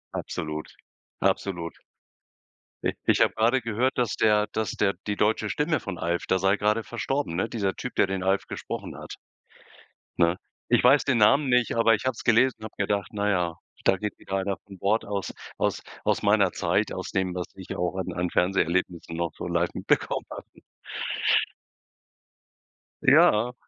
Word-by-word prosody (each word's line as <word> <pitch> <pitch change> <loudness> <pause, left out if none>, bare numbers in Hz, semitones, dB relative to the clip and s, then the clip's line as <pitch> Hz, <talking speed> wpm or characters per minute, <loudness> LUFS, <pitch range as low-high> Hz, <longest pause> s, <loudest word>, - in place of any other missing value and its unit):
Absolut, 75 0 -5 0.5
absolut. 85 -4 -1 1.1
Ich - - -1
ich - - +3
habe - - +4
gerade 120 +4 +2
gehört, 115 +3 0
dass 120 -3 0
der 105 -1 +3
dass 110 -1 -1
der 100 -1 +1
die 105 - 0
deutsche 105 +1 +1
Stimme 155 +5 0
von 100 -3 -6
„Alf“, 85 +1 -1
der 95 - +2
sei 95 +2 +2
gerade 105 +2 +1
verstorben, 120 -2 -2
ne? 95 - 0
Dieser 100 -4 -1
Typ, 125 - -6
der - - +4
den 95 -1 -3
„Alf“ 95 +1 +1
gesprochen - - -6
hat, - - -8 1.0
ne? 85 +1 +3 0.3
Ich - - +4
weiß 135 +4 +6
den 130 -5 +1
Namen 135 +7 +5
nicht, 125 -2 +2
aber 115 0 +4
ich 105 - -1
hab's 130 -3 -2
gelesen 120 +2 +4
und - - -10
habe 110 - -8
gedacht: 100 -1 0
„Na 105 0 0
ja, 90 -4 0 0.3
da - - +4
geht 105 +1 -4
wieder 95 - -4
einer 95 0 -2
von 95 -2 -13
Bord 105 +5 +1
aus 100 -1 -3 0.3
aus - - 0 0.2
aus - - +1
meiner - - +4
Zeit, - - 0
aus - - -5
dem, 95 -1 -1
was 90 -1 -2
ich 95 -1 -8
auch 90 +1 -1
an 95 -1 -3
an 90 0 -2
Fernseherlebnissen 90 -2 0
noch 85 -1 -2
so - - -6
live 85 0 +1
mitbekommen - - 0
habe“ - - -8 2.6
Ja. 115 +4 +5
100 Hz, 170 wpm, -26 LUFS, 90-115 Hz, 2.6 s, weiß